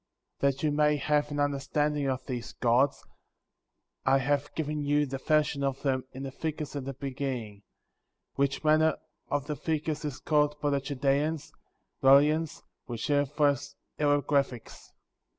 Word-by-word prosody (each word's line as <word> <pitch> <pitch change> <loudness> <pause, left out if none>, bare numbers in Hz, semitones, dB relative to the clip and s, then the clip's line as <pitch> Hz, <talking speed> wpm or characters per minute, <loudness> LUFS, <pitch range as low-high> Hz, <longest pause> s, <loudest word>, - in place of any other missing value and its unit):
*^ - - -55
14. 140 - +5
That - - -9
you 150 - +2
may 150 0 +3
have 150 0 +1
an 145 0 -3
understanding 145 +1 0
of 130 0 -3
these 125 -3 -5
gods, 125 +3 +2 1.0
I 135 - +4
have 140 +1 0
given 150 -1 -2
you 145 +1 +2
the 135 -1 -5
fashion 150 -1 +1
of 135 0 -2
them 130 -2 0
in 135 - -7
the 135 - -5
figures 150 0 -4
at 140 -2 -4
the 135 -1 -5
beginning, 130 -6 -4 0.7
which 140 +1 0
manner 155 0 +4 0.3
of 145 -1 -1
the 150 - -3
figures 155 0 -2
is 145 -3 -4
called 150 -1 +1
by 145 -1 0
the 140 -1 +1
Chaldeans, 140 +3 -1 0.5
Rahleenos, 150 +4 +4 0.2
which 120 -2 -4
signifies 145 0 +1 0.2
hieroglyphics. 145 -4 0
145 Hz, 150 wpm, -29 LUFS, 135-150 Hz, 1.0 s, 14